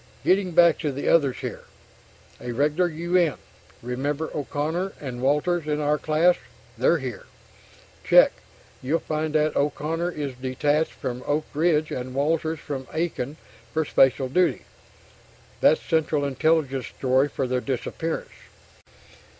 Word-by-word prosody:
Getting 185 -1 +2
back 170 -1 +5
to 150 -3 -1
the 140 +1 -4
others 145 -6 +3
here... - - -6 0.8
a 120 - -4
regular 150 +7 +1
U. 170 +2 -3
N. 170 -6 +3 0.5
Remember 140 +6 -2
O'Connor 155 +6 -2
and 125 -4 -6
Walters 150 +4 +1
in 150 0 0
our 150 0 +1
class? 160 +4 +3 0.4
They're 130 +8 +3
here. 130 -8 -6 0.8
Check, - - +6 0.5
you'll 140 +6 +1
find 155 -1 -3
that 155 0 +2
O'Connor 155 +4 -1
is 145 -3 -4
"detached" 135 +5 0
from 125 -3 -5
Oak 150 +1 0
Ridge 155 0 +2
and 130 +1 -5
Walters 160 +3 0
from 135 -3 -6
Aiken 155 -4 -3 0.3
for 160 0 0
"special 135 -1 +3
duty." 180 +7 +1 1.0
That's 480 - +5
Central 155 -3 +1
Intelligence's 140 -2 0
story 130 +1 +2
for 135 - -3
their 125 0 -1
disappearance. 140 +5 -3
150 Hz, 135 wpm, -24 LUFS, 135-160 Hz, 1.0 s, Check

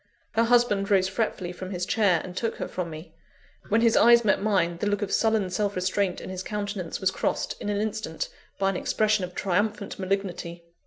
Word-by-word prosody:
Her 230 +1 +2
husband 230 -5 +3
rose 190 -2 +4
fretfully 190 -3 -2
from 185 +1 -7
his 180 -2 -3
chair, 195 -7 +2
and 180 -1 -8
took 225 +4 -1
her - - -4
from 180 -2 -4
me. 155 +2 -9 0.6
When 225 +2 +3
his 230 -1 +4
eyes 235 0 +6
met 200 - +3
mine, 185 -5 +1
the 205 - -1
look 205 0 0
of 195 - -4
sullen 220 -4 +2
self 205 +2 -1
restraint 185 +1 0
in - - -7
his 185 -1 -4
countenance 205 -3 -4
was 190 -1 +2
crossed, - - -1
in - - -3
an 205 -1 0
instant, 215 -6 -3 0.3
by 195 0 +2
an 185 - -3
expression 215 0 +1
of 180 - -12
triumphant 205 +2 -1
malignity. 185 -3 -3
195 Hz, 205 wpm, -26 LUFS, 185-215 Hz, 0.6 s, eyes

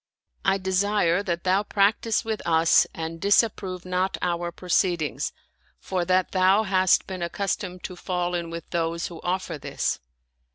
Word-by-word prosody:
I 195 0 +3
desire 190 -1 +1
that 175 -4 -3
thou 190 +2 +3
practice 210 +3 +1
with 220 -2 -2
us 165 0 +4
and 165 0 -6
disapprove 195 -3 +1
not 185 +1 -1
our 175 -1 -1
proceedings, 175 -3 0 0.5
for 185 -2 -2
that 185 +1 +2
thou 190 +3 +4
hast 190 -2 +3
been 185 -2 -6
ac 170 - -1
customed 190 -2 -3
to 180 - -6
fall 180 -1 -2
in 170 -1 -2
with 165 0 -7
those 165 -1 -1
who 170 -2 -10
offer 180 -3 -2
this." - - -2
185 Hz, 155 wpm, -25 LUFS, 170-195 Hz, 0.5 s, us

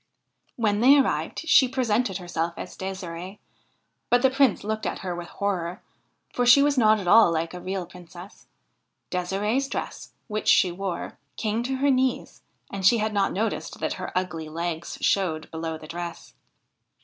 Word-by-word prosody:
When 210 -3 +1
they 265 +5 +7
arrived 285 +4 -1
she 270 -5 +6
presented 245 -6 0
herself 170 -2 -3
as - - -7
Ddsirde; 190 0 -6 0.7
but 245 +1 +3
the 265 - +5
Prince 265 -4 +2
looked 215 +1 -2
at - - -4
her 180 - -2
with 175 0 -7
horror, 180 -3 -3 0.5
for 245 - 0
she 245 +3 +7
was 290 0 +2
not 215 -4 +4
at 190 - -6
all 215 -1 +7
like 165 +1 -2
a 180 - -6
real 185 0 -3
Princess. 180 +1 -13 0.6
De'sireVs 205 +9 -1
dress, - - -6
which 215 -2 -4
she 180 - +5
wore, 185 0 -5 0.2
came 220 +1 -1
to 260 +2 -2
her 280 +1 +2
knees, 260 -1 -1 0.3
and 195 -1 -5
she 210 +6 +6
had 215 0 -1
not 200 -1 +1
noticed 220 +4 -3
that - - -1
her - - -5
ugly 165 -4 -3
legs 170 +1 -4
showed 165 -5 0
below 160 0 -4
the 155 - -12
dress. 170 0 -7
195 Hz, 170 wpm, -25 LUFS, 175-235 Hz, 0.7 s, they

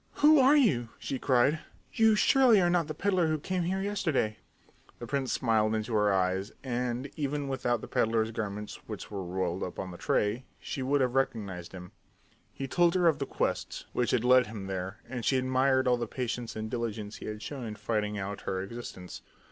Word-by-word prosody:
"Who 305 0 +6
are 270 +3 +6
you?" 130 - +3
she 135 - -4
cried. 135 +4 +3 0.3
"You 225 -2 +5
surely 245 -1 +5
are 175 -2 +3
not 170 -3 +2
the 155 - -5
peddler 185 -1 +1
who 155 0 +1
came 185 +5 -2
here 190 +3 -1
yesterday!" 160 - 0 0.6
The 120 - -7
prince 135 +1 -1
smiled 110 -3 +2
into 110 +2 -3
her 105 -1 +3
eyes, 95 +1 0
and, 125 +1 -2
even 145 -1 -2
without 125 -3 -1
the - - -7
peddler's 110 0 +1
garments 105 -1 -4
which - - -7
were 100 -2 -4
rolled 90 0 -2
up 90 - -4
on 95 - -4
the 85 - -10
tray, 105 +5 0
she 135 - -5
would 140 +2 +2
have 125 -1 +1
recognized 100 -9 -2
him. 90 -1 -10 0.6
He 135 - -5
told 175 +5 +3
her 180 -2 +4
of 155 -4 +3
the 140 - -2
quest - - -2
which 120 -2 +1
had 120 -3 +1
led 125 0 +5
him 105 -3 -7
there, 95 -1 -4
and 125 -1 -5
she 135 - +2
admired 130 +1 +2
all 125 -1 +4
the 120 -1 -3
patience 120 -1 -4
and 110 0 -4
diligence 110 -3 -4
he - - -8
had 105 0 -6
shown 135 0 -6
in 105 - -5
finding 105 0 -2
out 100 0 -4
her 95 - -2
existence. 95 -3 -7
120 Hz, 205 wpm, -29 LUFS, 105-140 Hz, 0.6 s, Who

